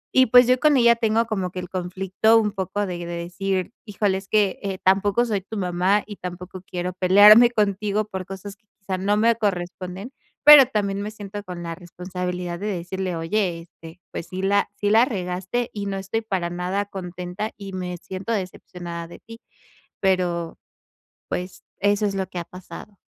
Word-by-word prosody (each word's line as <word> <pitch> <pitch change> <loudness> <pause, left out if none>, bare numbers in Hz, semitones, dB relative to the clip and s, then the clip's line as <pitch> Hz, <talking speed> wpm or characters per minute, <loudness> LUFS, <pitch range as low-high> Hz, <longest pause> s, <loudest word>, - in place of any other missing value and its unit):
Y 260 0 +6
pues, 245 +2 +7
yo 250 +1 +3
con 300 -1 +4
ella 235 -1 +6
tengo 225 0 +1
como 195 -5 -2
que 185 - -12
el 180 -1 -7
conflicto 190 +4 +1
un 215 -2 +2
poco 195 +1 -2
de 180 -2 -4
decir: 180 +3 -3
"Híjole 205 -2 0
es 195 - -15
que, 205 -3 +2
eh, 195 -2 -3
tampoco 200 +5 +3
soy 210 -4 -1
tu 215 +4 -8
mamá, 185 +2 +1
y 205 -2 -9
tampoco 180 +1 -8
quiero 180 0 -4
pelearme 205 +6 +7
contigo 210 -1 0
por 190 -3 -6
cosas 195 +1 -8
que 210 - -45
quizá 190 -2 -4
no 205 +2 +1
me 230 +2 +4
corresponden", 185 +1 -3 0.3
pero 290 -2 +10
también 200 -4 -1
me 205 - -4
siento 205 -1 -8
con 180 -3 -7
la 170 -1 -4
responsabilidad 180 0 -5
de 205 - -4
decirle: 185 -1 -3
"Oye, 170 +1 -1
este, 165 0 -14
pues, 165 - -6
sí 185 +1 -5
la 200 +1 +2
sí 205 0 0
la 225 +3 +6
regaste, 190 +1 -3
y 205 -1 -4
no 195 0 -3
estoy 195 +4 -3
para 190 -6 -2
nada 180 +3 -2
contenta, 185 +1 -6
y 195 -1 -8
me 180 -1 -4
siento 190 +6 -5
decepcionada 175 -3 -6
de 170 - -12
ti". 230 +1 -13 0.6
Pero, 175 -3 0 0.7
pues, 180 +1 -5 0.2
eso 205 +1 +2
es 200 - 0
lo 190 -1 -2
que - - -8
ha 170 - -3
pasado. 185 +3 -11
195 Hz, 185 wpm, -23 LUFS, 180-210 Hz, 0.7 s, pero